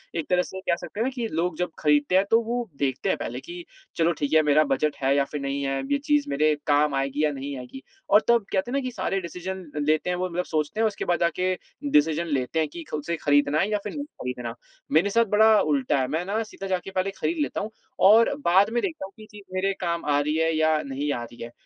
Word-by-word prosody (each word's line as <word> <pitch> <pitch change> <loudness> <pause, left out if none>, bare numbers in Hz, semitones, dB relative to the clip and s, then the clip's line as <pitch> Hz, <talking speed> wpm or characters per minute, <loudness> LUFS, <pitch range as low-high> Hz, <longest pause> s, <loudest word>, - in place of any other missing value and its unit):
एक 165 - -2
तरह 180 0 +3
से 190 - -8
कह 175 - +1
सकते 175 +4 -9
हैं 230 - +2
ना - - +1
कि 235 -2 -2
लोग 165 +1 -1
जब 180 0 -1
खरीदते 150 +3 +2
हैं, 190 - +5
तो 225 - +5
वो 240 0 -3
देखते 135 -2 -1
हैं - - +1
पहले 125 +2 -5
कि, 175 +5 -9 0.3
"चलो, 165 +1 +2
ठीक 145 0 -3
है, 160 - +7
मेरा 155 +2 +5
बजट 150 +1 0
है 135 +1 +3
या 140 - +3
फिर 145 +1 -6
नहीं 140 0 -2
है? 135 0 -1
अब 275 - -7
ये 285 - +4
चीज़ 295 -1 +3
मेरे 150 +2 +2
काम 145 -1 +3
आएगी 135 +2 -1
या 150 - +2
नहीं 140 0 -5
आएगी?" 125 - -9 0.3
और 210 +2 +6
तब 235 -4 +4
कहते 200 +5 0
हैं - - -4
ना - - +2
कि 255 - -4
सारे 195 -3 -2
डिसीज़न 185 +2 -6 0.2
लेते 155 +3 +1
हैं, 180 - 0
वो 185 0 -2
मतलब 180 +1 -2
सोचते 155 +7 -2
हैं, 225 - +4
उसके 205 - -4
बाद 175 -2 +1
जाके 180 +2 +1 0.4
डिसीज़न 160 +3 +3
लेते 140 +2 -1
हैं 155 - +1
कि 170 +2 -8
खुद 150 - -3
से 170 - -1
खरीदना 145 +1 +3
है 195 - +1
या 210 - +2
फिर 205 - -5
नहीं 290 0 -4
खरीदना? 125 - -6 0.4
मेरे 165 +7 +4
साथ 230 +3 +3
बड़ा 220 -1 +6
उल्टा 140 -2 +1
है, 130 - -1
मैं 160 +5 -2
ना 210 +4 -1
सीधा 195 -2 -8
जा 185 -1 0
के 195 - -8
पहले 190 +1 -1
खरीद 335 - 0
लेता 290 - -1
हूँ 215 +2 -5 0.4
और 230 +6 +6
बाद 190 +4 +5
में 240 +1 0
देखता 315 - -3
हूँ 195 - -12
कि - - -13
ये - - -14
चीज़ 205 -1 -12
मेरे 195 +1 0
काम 170 -1 -2
आ 145 -1 +2
रही 150 +2 0
है 160 0 +1
या 155 -1 +3
नहीं 140 +1 -3
आ 120 - -4
रही 120 0 -12
है? 120 - -8
170 Hz, 270 wpm, -25 LUFS, 145-195 Hz, 0.4 s, है